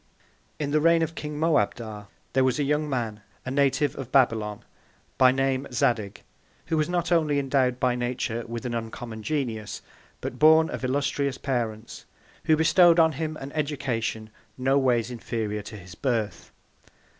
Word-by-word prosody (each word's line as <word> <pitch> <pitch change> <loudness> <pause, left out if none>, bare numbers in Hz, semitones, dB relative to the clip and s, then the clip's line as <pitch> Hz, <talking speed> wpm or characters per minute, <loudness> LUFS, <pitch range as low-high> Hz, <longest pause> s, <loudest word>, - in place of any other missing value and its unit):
In 145 -2 -3
the 155 +1 +2
Reign 165 +1 +4
of 160 0 -3
King 150 -2 -6
Moabdar, 115 -10 0 0.3
there 130 - +3
was 130 +1 +2
a 145 - +1
young 150 +2 0
Man, 115 -6 -3 0.2
a 130 - -3
Native 140 +1 +2
of 135 -2 -7
Babylon, 110 -6 +2 0.6
by 130 -1 +7
name 135 0 0
Zadig; 110 -5 0 0.4
who 160 - -1
was 155 +2 +1
not 175 -1 -1
only 155 -4 +3
endowed 130 -2 +1
by 125 -1 +2
Nature 120 -1 -2
with 115 +1 -6
an 120 - -2
uncommon 115 0 -5
Genius, 115 -5 -3 0.4
but - - -6
born 160 +1 +6
of - - -5
illustrious 140 +1 0
Parents, 115 -5 -3 0.4
who 155 - +5
bestowed 170 +1 +5
on 160 -1 +5
him 155 +1 -4
an 135 -1 -8
Education 130 -7 -2 0.3
no 135 +2 +2
ways 125 -3 +1
inferior 110 -3 -3
to 105 +1 -9
his 90 -1 -12
Birth. 110 -3 -2
130 Hz, 160 wpm, -26 LUFS, 115-150 Hz, 0.6 s, by